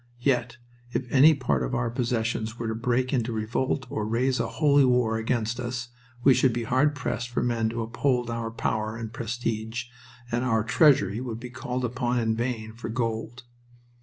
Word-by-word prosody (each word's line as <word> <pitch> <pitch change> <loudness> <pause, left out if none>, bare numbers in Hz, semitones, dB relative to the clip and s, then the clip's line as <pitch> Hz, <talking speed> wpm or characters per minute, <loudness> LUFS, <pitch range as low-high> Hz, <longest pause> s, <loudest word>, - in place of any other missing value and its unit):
Yet 120 -3 +1 0.3
if 130 - -1
any 150 +4 +7
part 100 - 0
of - - -1
our 120 -1 0
possessions 115 -2 -1
were 115 - -3
to 110 - -1
break 125 +3 0
into 120 -2 0
revolt 115 +5 -1
or 110 - -2
raise 125 +3 +1
a 115 - 0
"holy 145 0 +4
war" 125 -3 +3
against 115 +1 -1
us, 120 -1 -4 0.3
we 135 - +7
should 125 +1 +3
be 120 0 -2
hard 130 +5 +2
pressed 125 -4 -3
for 120 - -1
men 115 -2 +1
to 115 0 -3
uphold 120 +2 0
our 115 -1 -3
power 110 -1 -2
and 115 -1 -6
prestige, 115 0 -3 0.5
and 120 +1 0
our 115 -4 +2
treasury 110 - +4
would 115 -3 -5
be 125 0 -8
called 125 0 -3
upon 125 0 -1
in 110 -2 +1
vain 115 -2 -3
for 115 0 -7
gold. 115 +1 -3
120 Hz, 185 wpm, -26 LUFS, 115-125 Hz, 0.5 s, any